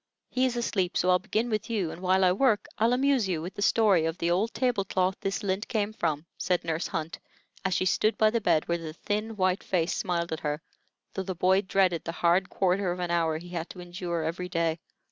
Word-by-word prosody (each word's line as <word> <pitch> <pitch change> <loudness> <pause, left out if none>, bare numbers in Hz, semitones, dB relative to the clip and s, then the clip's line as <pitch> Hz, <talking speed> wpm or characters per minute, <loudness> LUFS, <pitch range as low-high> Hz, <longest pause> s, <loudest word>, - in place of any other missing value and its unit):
He 255 0 +2
is 250 -2 0
asleep, 195 -6 0
so 185 - +3
I'll 180 - +4
begin 215 +4 -1
with 215 +1 -2
you, 200 -8 -1
and 175 - -9
while 190 +1 +3
I 180 - +5
work 215 +2 +2
I'll 225 +2 +3
amuse 260 -5 +2
you 170 -4 0
with 175 +4 -6
the 205 - -6
story 200 -6 +4
of 165 +1 -2
the 170 0 0
old 205 +6 +1
table 245 -6 0
cloth 185 -1 0
this 195 -2 -2
lint 195 +2 -1
came 215 -2 -1
from," 160 -6 -1
said 180 -1 0
Nurse 165 0 -2
Hunt, 160 -3 -4 0.4
as 190 -1 0
she 185 - +1
stood 215 +4 +2
by 215 0 +4
the 230 0 0
bed 155 -6 +2
where 170 0 0
the 160 -2 -6
thin, 215 +5 -3
white 185 -1 +1
face 175 -2 0
smiled 170 -3 -1
at 160 - -3
her, 150 0 -2 0.5
though 190 - -2
the 190 -1 -4
boy 190 +3 +3
dreaded 185 -3 +1
the 165 - -4
hard 175 +2 +2
quarter 185 0 +1
of 180 - -4
an 175 -1 -2
hour 165 -2 +1
he 175 +2 -10
had 170 -1 -4
to 180 - -10
endure 175 -1 -4
every 175 +3 -3
day. 165 -2 0
185 Hz, 240 wpm, -28 LUFS, 170-205 Hz, 0.5 s, I